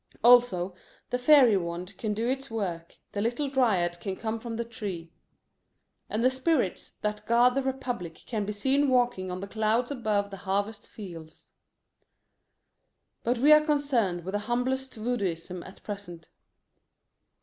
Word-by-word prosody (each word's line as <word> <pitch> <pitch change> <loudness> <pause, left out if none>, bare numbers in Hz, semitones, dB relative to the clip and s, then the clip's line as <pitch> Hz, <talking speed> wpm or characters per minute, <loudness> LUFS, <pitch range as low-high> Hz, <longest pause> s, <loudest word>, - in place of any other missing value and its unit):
Also 235 -7 +5 0.4
the 250 - 0
fairy 255 -4 +7
wand 175 +2 -5
can 210 -2 -1
do 225 +3 -1
its 270 +2 -2
work, 180 -7 -4
the 205 - -2
little 240 +6 0
dryad 190 -10 +2
can 195 0 -4
come 225 +2 -3
from 230 0 -5
the 235 +1 -2
tree. 190 -8 -6 1.0
And 220 +2 -1
the 255 - +5
spirits 260 - 0
that 210 0 -3
guard 240 +2 +5
the 275 - +1
Republic 245 -10 -3
can 220 -4 -2
be 205 - -3
seen 270 +7 +2
walking 245 -7 +1
on 180 +1 -4
the 200 - -5
clouds 220 +4 0
above 210 -6 -1
the 195 - -7
harvest 200 +2 -2
fields. 170 -6 -11 1.7
But 240 +1 +1
we 290 +6 +7
are 305 - +8
concerned 275 - +1
with 190 - -3
the 205 - +1
humblest 260 +2 -1
voodooism 190 -7 -3
at 190 - -14
present. 185 -6 -7
220 Hz, 150 wpm, -28 LUFS, 190-250 Hz, 1.7 s, are